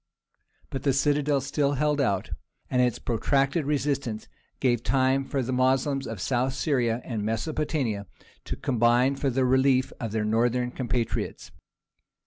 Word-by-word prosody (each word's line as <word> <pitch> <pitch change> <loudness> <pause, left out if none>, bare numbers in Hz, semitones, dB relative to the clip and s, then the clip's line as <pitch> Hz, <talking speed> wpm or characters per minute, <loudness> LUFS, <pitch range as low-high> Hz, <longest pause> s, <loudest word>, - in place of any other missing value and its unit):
But 135 - -3
the 140 0 +2
citadel 145 0 +2
still 140 +1 0
held 150 +1 +1
out, 100 -8 0 0.4
and 125 - +3
its 125 -2 +1
protracted 135 +6 0
resistance 140 -6 -1 0.3
gave 120 -3 +2
time 130 +3 +2
for 135 -1 -2
the 125 - -3
Moslems 130 +2 +1
of 110 -3 -6
South 130 +5 0
Syria 125 -5 0
and 115 -4 -3
Mesopotamia 115 - -2 0.4
to - - -3
combine 125 +1 +2
for 135 0 0
the 130 +1 +1
relief 130 0 +3
of 115 -3 -4
their 110 -1 -1
northern 120 +3 +1
compatriots. 125 -2 -3
130 Hz, 140 wpm, -26 LUFS, 120-140 Hz, 0.4 s, and